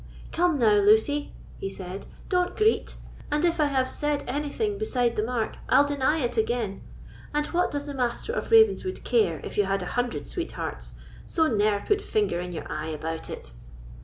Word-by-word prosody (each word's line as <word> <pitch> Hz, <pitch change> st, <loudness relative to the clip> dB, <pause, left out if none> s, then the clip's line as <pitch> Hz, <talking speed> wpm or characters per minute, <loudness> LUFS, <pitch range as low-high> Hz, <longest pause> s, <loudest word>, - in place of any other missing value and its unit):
"Come 345 Hz, -2 st, +2 dB
now, 215 Hz, -5 st, +4 dB
Lucy," 220 Hz, +8 st, +3 dB, 0.3 s
he 195 Hz, -, -3 dB
said, 190 Hz, 0 st, -7 dB, 0.2 s
"don't 360 Hz, -1 st, 0 dB
greet; 435 Hz, 0 st, +2 dB, 0.4 s
and 300 Hz, +3 st, +2 dB
if 340 Hz, -1 st, +1 dB
I 300 Hz, -, +5 dB
have 265 Hz, -2 st, +1 dB
said 295 Hz, +1 st, -1 dB
anything 300 Hz, -, -2 dB
beside 250 Hz, -, +1 dB
the -, -, +1 dB
mark, 230 Hz, 0 st, -2 dB
I'll 285 Hz, -, +6 dB
deny 285 Hz, +1 st, +1 dB
it 240 Hz, -1 st, -2 dB
again; 220 Hz, -3 st, 0 dB, 0.5 s
and 295 Hz, 0 st, +2 dB
what 355 Hz, +1 st, +2 dB
does 285 Hz, 0 st, -3 dB
the 290 Hz, -, -5 dB
Master 255 Hz, -, -1 dB
of -, -, -3 dB
Ravenswood 440 Hz, -4 st, +4 dB
care 445 Hz, -3 st, +2 dB
if -, -, -4 dB
you 205 Hz, -, +4 dB
had 195 Hz, 0 st, 0 dB
a 180 Hz, -, -5 dB
hundred 245 Hz, -1 st, -1 dB
sweethearts? 350 Hz, -1 st, -5 dB, 0.3 s
so 320 Hz, -, +2 dB
ne'er 210 Hz, -6 st, +2 dB
put 415 Hz, 0 st, +2 dB
finger 420 Hz, -, 0 dB
in 180 Hz, 0 st, -5 dB
your 165 Hz, -, -5 dB
eye 155 Hz, +1 st, -4 dB
about 160 Hz, +1 st, -4 dB
it." -, -, -8 dB
265 Hz, 185 wpm, -26 LUFS, 210-340 Hz, 0.5 s, I'll